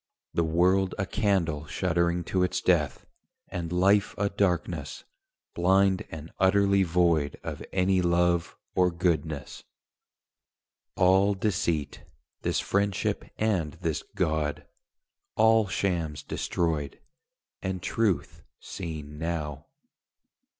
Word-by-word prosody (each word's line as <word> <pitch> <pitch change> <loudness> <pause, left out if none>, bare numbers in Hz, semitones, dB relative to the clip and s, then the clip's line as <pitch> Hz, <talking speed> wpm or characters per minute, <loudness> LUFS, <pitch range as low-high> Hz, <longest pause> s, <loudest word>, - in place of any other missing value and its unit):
The 85 - +2
world 90 +4 +2
a 100 - -1
candle 85 -8 0
shuddering 85 0 0
to 95 +2 -1
its 90 - +1
death, 80 -6 +1 0.4
And 85 -3 -4
life 100 +3 +3
a 100 0 0
darkness, 95 -4 -1 0.5
blind 95 +2 +3
and 80 0 -8
utterly 100 +1 +4
void 85 -5 +2
Of - - -5
any 95 0 +2
love 85 -1 +1 0.2
or 90 -1 +3
goodness: 85 -5 -2 1.3
all 95 +2 +4
deceit, 90 -7 -1 0.4
This - - 0
friendship 100 -1 0
and 95 -9 0
this - - -2
God: 80 -5 -1 0.7
all 110 -1 +4
shams 85 -7 -2
destroyed, 75 -4 -2 0.6
And 95 -1 -3
truth 105 -9 0 0.2
seen 75 -2 -7
now. 75 -4 -4
90 Hz, 100 wpm, -27 LUFS, 80-95 Hz, 1.3 s, utterly